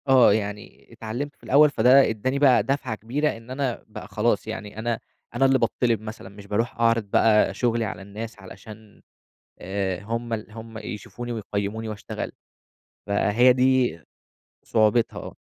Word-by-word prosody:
آه، 130 -5 +6
يعني 105 -1 -5
اتعلّمت 125 +7 -5
في - - -34
الأول 150 +3 +5
فده 130 +1 +5
ادّاني 130 +5 -1
بقى 135 -3 +5
دفعة 135 -4 -2
كبيرة، 130 +7 -1
إن 115 +1 -15
أنا 130 -2 -2
بقى 110 - -9
خلاص 110 +1 0
يعني 105 -1 -6
أنا 115 0 -1 0.4
أنا 135 +3 +3
اللي 135 0 +4
باتطّلب 115 -1 +1
مثلًا، 110 -3 -8
مش 100 0 -13
باروح 115 +4 -1
أعرض 115 -1 +3
بقى 105 0 +3
شغلي 115 +1 0
على 100 - -6
الناس 105 +3 -8
علشان 105 +3 -13 0.6
آآ، 95 0 -3
هم 115 +2 -3
ال 110 -1 -5
هم 110 0 -9
يشوفوني 110 +3 -7
ويقيّموني 110 0 -3
وأشتغل. 105 -1 -6 0.8
فهي 105 +5 +4
دي 130 -7 +2 0.6
صعوبتها، 110 +1 +2
آه. - - -9
115 Hz, 150 wpm, -24 LUFS, 105-125 Hz, 0.8 s, آه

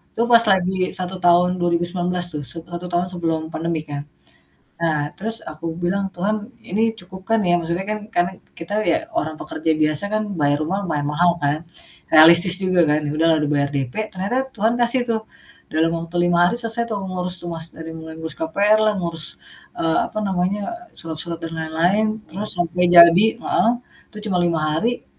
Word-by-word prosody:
itu 230 - -1
pas 235 - +9
lagi 185 -1 +2 0.3
1 185 0 -4
tahun 175 0 +4
2019 175 +1 -1
tuh, 150 - -4
set 165 -1 -6
satu 175 +1 -5
tahun 175 +1 0
sebelum 165 -3 -1
pandemi 165 -1 -2
kan. 145 -2 -6 0.8
Nah, 165 -2 +1 0.2
terus 225 +3 0
aku 155 +2 -9 0.2
bilang, 195 +3 0
"Tuhan 200 +5 0 0.3
ini 210 +4 0 0.2
cukup 185 +1 -11
kan 225 0 +3
ya?" 175 - +3
Maksudnya 170 +3 -3
kan 215 - -2 0.2
karena 175 +1 +2 0.3
kita 165 +4 -6 0.2
ya 325 - +3 0.2
orang 155 - -1
pekerja 160 +1 -2
biasa 155 +3 +3
kan 215 - +1 0.2
bayar 145 0 +2
rumah 190 +5 -1
mayan 145 -2 -1
mahal 175 +3 +4
kan, 145 +1 +1 0.5
realistis 170 +3 +8
juga 185 -1 +2
kan. 150 +1 +3
Ya 145 - -2
udahlah 160 +1 +3
udah 150 - 0
bayar 140 0 +1
DP, 130 -3 -2 0.2
ternyata 195 +6 -3 0.2
Tuhan 220 +2 +1
kasih 240 +2 +3
tuh 225 -1 0 0.5
dalam 160 +1 +2
waktu 170 +1 -9
5 175 0 +2
hari 235 - 0
selesai 230 +1 -1
tuh 215 - -2
ngurus 180 -1 0
rumah. 165 -2 -4
Dari 160 0 -8
mulai 160 0 -9
ngurus 160 -1 -5
KPR 200 +7 +2
lah, 215 - +3
ngurus, 165 -3 -3 0.5
eee, 165 -1 +1
apa - - -10
namanya, 190 +2 0 0.4
surat-surat, 165 +1 -5
dan 165 0 -5
lain-lain, 170 +7 +1 0.2
terus 205 +6 -3
sampai 175 +1 +1
jadi 170 +4 +9 0.2
heeh, 230 - +2 0.4
itu 215 - -13
cuma 185 - +1
5 170 -2 +1
hari. 230 +11 -1
175 Hz, 180 wpm, -21 LUFS, 160-190 Hz, 0.8 s, pas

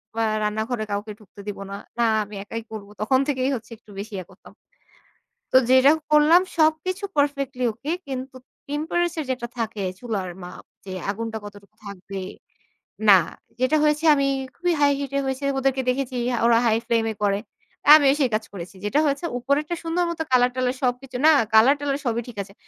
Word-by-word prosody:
বা 225 - 0 0.2
রান্নাঘরে 220 +2 -2
কাউকে 205 +2 -3
ঢুকতে 205 -1 -18
দিব 205 - -4
না। - - -4 0.2
না - - +4 0.2
আমি 205 0 -11
একাই 230 +2 -6
করব। 205 -2 -7
তখন 260 +4 +3
থেকেই 260 -2 0
হচ্ছে 230 0 -9
একটু 215 -2 -19
বেশি 210 +1 -7
ইয়া 185 - -6
করতাম। - - -17 1.0
তো - - +5
যেটা 260 +2 +7 0.2
করলাম 305 +4 +6 0.2
সবকিছু 320 +5 +1
perfectly 275 -3 0
okay 285 +10 -4
কিন্তু 260 0 -5 0.3
টেম্পারেচার 320 +2 -1
যেটা 250 -2 -2
থাকে 220 -3 -3 0.2
চুলার 205 -7 -4
মাপ 180 - -10 0.2
যে 190 - -7 0.2
আগুনটা 225 +1 -4
কতটুকু 205 0 -12
থাকবে, 195 0 -7 0.9
না 195 - +10 0.4
যেটা 255 +5 +2
হয়েছে 300 +2 +2
আমি 275 -1 +1 0.3
খুবই 350 -1 0
হাই 285 -1 +4
হিট 275 -2 -4 0.2
হইছে। 265 +1 -3
ওদেরকে 265 0 +1
দেখেছি 255 0 -2 0.2
হা 240 - -1
ওরা 235 -1 +5
হাই 225 -1 +3
ফ্লেম 230 -1 +2
এ - - -5
করে। 200 0 +2 0.6
আমিও 280 -3 +5
সেই 260 -3 +2
কাজ 215 +1 0
করেছি। 180 0 -8
যেটা 275 +8 +1
হয়েছে 285 +4 -1
উপরেরটা 285 +6 0
সুন্দর 330 +2 0
মতো 325 -1 -3
কালার-টালার 250 0 +2
সবকিছু, 250 +1 -2
না 315 - +8 0.2
কালার 230 +6 +6
টালার 285 -1 -1
সবই 235 0 0
ঠিক 230 -4 -11
আছে। 195 - -17
255 Hz, 175 wpm, -23 LUFS, 220-285 Hz, 1.0 s, না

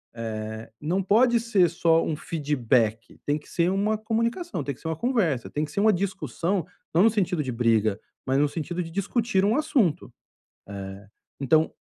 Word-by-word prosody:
eh, 110 -1 -5
não 175 +6 0
pode 235 +5 +4
ser 210 -7 +3
só 165 0 +2
um 155 - -1
feedback. 125 -8 -1
Tem 145 +1 +1
que 150 - -19
ser 170 0 +1
uma 205 +3 +1
comunicação, 230 +10 -2
tem 140 - -4
que - - -23
ser - - -6
uma 160 - -1
conversa, 185 - 0
tem 150 - -2
que 145 - -12
ser 200 - -2
uma 215 0 +5
discussão, 185 -1 -2 0.3
não 175 - +6
no 225 - +7
sentido 185 -6 0
de 130 - -3
briga, 110 -3 +2 0.3
mas 130 0 +1
no 150 - +4
sentido 175 +3 -3
de 165 - -9
discutir 200 +2 0
um 210 - +3
assunto. 270 - +1 1.3
Eh, - - -2
então, 155 +4 +3
170 Hz, 180 wpm, -25 LUFS, 140-210 Hz, 1.3 s, no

